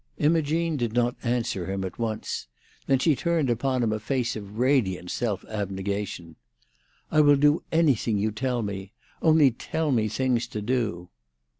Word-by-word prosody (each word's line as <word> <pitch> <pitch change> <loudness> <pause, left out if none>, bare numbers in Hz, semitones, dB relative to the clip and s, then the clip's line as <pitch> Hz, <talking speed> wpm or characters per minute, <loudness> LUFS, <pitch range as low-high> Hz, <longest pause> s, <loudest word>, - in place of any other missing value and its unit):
Imogene 160 +1 +1
did 120 -4 -2
not 120 0 +1
answer 115 -7 -1
him 95 0 -2
at 95 +2 -6
once. 110 - -3 0.4
Then 135 - +4
she 150 +3 +3
turned 165 -4 +1
upon 125 +1 0
him 110 -2 +1
a 110 - -2
face 120 +2 -1
of 105 -1 -8
radiant 115 -9 +1
self 110 -5 -2
abnegation. 100 -4 -4 0.7
"I 155 - +5
will 145 -1 +6
do 145 +2 +3
anything 140 -9 +2
you 105 +2 0
tell 125 +2 -1
me. 100 -1 -5 0.3
Only 155 -4 +5
tell 155 +6 -2
me 110 -4 +2
things 125 +2 0
to 105 - -5
do." 105 -7 -1
120 Hz, 160 wpm, -26 LUFS, 105-140 Hz, 0.7 s, will